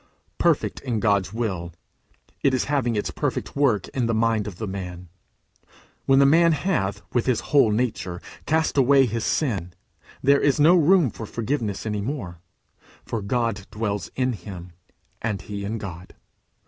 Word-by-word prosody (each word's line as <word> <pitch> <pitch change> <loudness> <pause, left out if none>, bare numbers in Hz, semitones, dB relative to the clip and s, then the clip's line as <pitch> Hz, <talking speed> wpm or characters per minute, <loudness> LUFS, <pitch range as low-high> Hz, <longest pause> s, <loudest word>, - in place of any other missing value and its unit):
Perfect - - +1
in 120 -5 -2
God's 100 -3 +1
will, 95 -7 -3 0.7
it 135 -1 +3
is 130 - +1
having 135 -5 0
its 105 - -1
perfect - - -3
work 130 -9 +2
in 125 -3 -1
the 115 - 0
mind 110 -2 +1
of 100 - -6
the 110 - -4
man. 90 -3 -6 1.0
When 135 - +5
the 140 - +6
man 165 +4 +5
hath, 105 - -1
with 120 0 +1
his 125 -4 +2
whole 140 -6 +6
nature, 105 -6 -1 0.3
cast 160 -2 +2
away 135 +1 +5
his 115 -1 -2
sin, 95 - -1 0.5
there 140 +1 +5
is 145 +1 +2
no 155 +4 +7
room 170 - +4
for 110 - -8
forgiveness 115 -4 -3
any 105 -2 -2
more, 100 - -5 0.7
for 115 - -3
God 105 -1 -1
dwells 105 -5 -3
in 130 -1 +1
him, 90 -3 -9 0.5
and 105 -4 -2
he 100 -1 -6
in 105 +3 -3
God. 90 -4 -8
115 Hz, 160 wpm, -24 LUFS, 100-135 Hz, 1.0 s, no